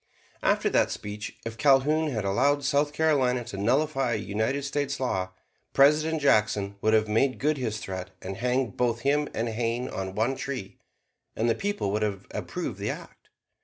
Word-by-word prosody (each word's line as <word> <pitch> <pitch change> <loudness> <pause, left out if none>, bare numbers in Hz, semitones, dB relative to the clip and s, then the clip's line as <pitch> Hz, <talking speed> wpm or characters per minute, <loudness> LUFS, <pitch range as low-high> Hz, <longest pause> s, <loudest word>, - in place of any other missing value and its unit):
After - - +2
that - - +3
speech, 105 +1 -6
if 115 +1 -6
Calhoun 150 +3 +4
had 110 -7 -2
allowed 140 +9 +2
South 140 +2 +2
Carolina 140 -6 +2
to 115 -3 -8
nullify 135 +4 +1
a - - +1
United 110 +6 -1
States 140 0 -2
law, 95 -8 -1 0.4
President 150 +2 +4
Jackson 105 -5 +2
would 110 0 +3
have 110 0 +3
made 120 +5 +2
good 150 +2 +1
his 115 -5 -2
threat 95 -2 -5
and 95 +1 -6
hanged 125 -2 0
both 120 -2 0
him 145 +2 +1
and 115 +1 -1
Hayne 115 +2 -1
on 95 0 -5
one 115 +5 +1
tree, 115 -9 -6 0.6
and 115 - 0
the 115 - +4
people 205 - -2
would 105 +1 0
have 100 -3 -2
approved - - -4
the - - -2
act. - - -8
125 Hz, 175 wpm, -27 LUFS, 105-140 Hz, 0.6 s, Calhoun